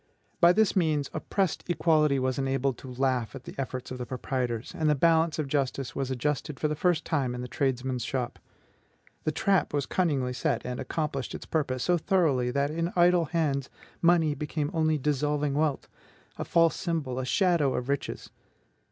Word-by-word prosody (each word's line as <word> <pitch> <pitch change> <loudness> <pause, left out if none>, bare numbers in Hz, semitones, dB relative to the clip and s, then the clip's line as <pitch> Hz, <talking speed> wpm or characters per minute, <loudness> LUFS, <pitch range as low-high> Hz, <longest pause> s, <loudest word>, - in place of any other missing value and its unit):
By 170 -1 +7
this 215 +2 +3
means, 155 -6 +1
oppressed 195 -5 -1
equality 155 -4 +3
was 130 0 0
enabled 135 -1 0
to 130 - -9
laugh 125 -2 0
at - - -9
the - - -9
efforts 130 -2 -4
of 130 - -5
the 125 - -3
proprietors, 125 -2 -3
and 155 -1 +1
the 150 - +4
balance 165 +2 +3
of 155 -3 -2
justice 135 -2 -1
was 135 -1 -2
adjusted 140 +2 -2
for 155 - +1
the 150 - -2
first 170 0 +1
time 135 -6 0
in 125 - -5
the 125 - -5
tradesman's 130 -1 -1
shop. 125 -1 -3 0.9
The 155 - +2
trap 180 +1 +1
was 140 -2 0
cunningly 140 -9 0
set, 130 -2 -1
and 125 0 -4
accomplished 145 -5 -3
its - - -8
purpose 130 -5 -1
so 175 -1 +2
thoroughly 150 -9 +2
that 140 +3 0
in 165 +2 -1
idle 175 -1 +4
hands 145 -4 -1 0.3
money 165 -3 +4
became 150 0 -3
only 155 -2 +2
dissolving 150 0 0
wealth, 150 -1 0 0.5
a - - -4
false 165 -1 +3
symbol, 160 -8 -2
a - - -2
shadow 170 -4 +2
of 125 - -3
riches. 140 0 -3
145 Hz, 180 wpm, -28 LUFS, 130-160 Hz, 0.9 s, By